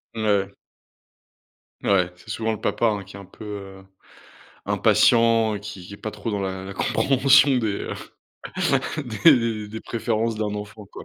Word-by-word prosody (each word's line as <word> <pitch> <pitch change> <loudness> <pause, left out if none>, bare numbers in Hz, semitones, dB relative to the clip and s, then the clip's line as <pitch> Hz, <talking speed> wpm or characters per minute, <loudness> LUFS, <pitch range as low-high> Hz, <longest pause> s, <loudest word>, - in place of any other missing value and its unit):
Mouais 110 - -3 0.2
ouais. 100 - -20 1.3
Mouais, 90 -3 +2
c'est 90 - -18
souvent 110 0 -1
le 110 - -7
papa, 115 - 0
hein, 105 -3 -1
qui 100 +1 -12
est - - -10
un 100 - -11
peu, 95 - -14
heu, 95 -2 -8 0.8
impatient, 115 -2 +3
qui 100 -3 -9
qui 100 - -10
est - - -10
pas 110 - -6
trop 105 +1 -5
dans 100 - -2
la 95 -1 -4
la 95 +1 -7
compréhension 135 +4 +4
des, 110 -4 0
heu, - - -5 1.1
des 130 +5 +5
des 115 -3 -2
des 110 +2 -7
préférences 115 -1 -2
d'un 105 -1 -2
enfant, 105 +1 -8
quoi. - - -9
105 Hz, 175 wpm, -23 LUFS, 100-115 Hz, 1.3 s, des